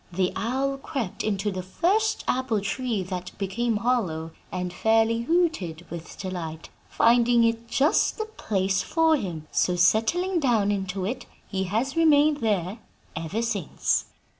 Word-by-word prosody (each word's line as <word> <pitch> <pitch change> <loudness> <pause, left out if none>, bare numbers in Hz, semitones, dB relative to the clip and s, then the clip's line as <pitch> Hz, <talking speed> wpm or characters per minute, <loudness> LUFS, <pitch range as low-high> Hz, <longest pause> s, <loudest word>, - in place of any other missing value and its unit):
The 180 +1 0
owl 270 +5 -1
crept 270 - -4
into 205 -1 -1
the 185 -1 -4
first 400 - 0
apple 255 -4 +1
tree 205 +1 -2
that 180 -1 -6
became 215 +4 -1
hollow, 190 -9 -1 0.2
and 180 -1 -3
fairly 225 +3 +2
hooted 235 - 0
with 170 0 -8
delight, 165 -4 -6 0.2
finding 235 0 +4
it 230 0 0
just 275 +6 +2
the 435 - -2
place 195 - -1
for 325 -1 +3
him; 175 - -5
so, 180 - +2
settling 230 - +2
down 225 -8 +2
into 190 -1 -2
it, 245 +4 -4 0.2
he 190 -1 -2
has 230 +9 -1
remained 305 -2 +4
there 210 -4 -1 0.4
ever 165 +8 -2
since.' 210 -8 0
220 Hz, 140 wpm, -25 LUFS, 185-260 Hz, 0.4 s, finding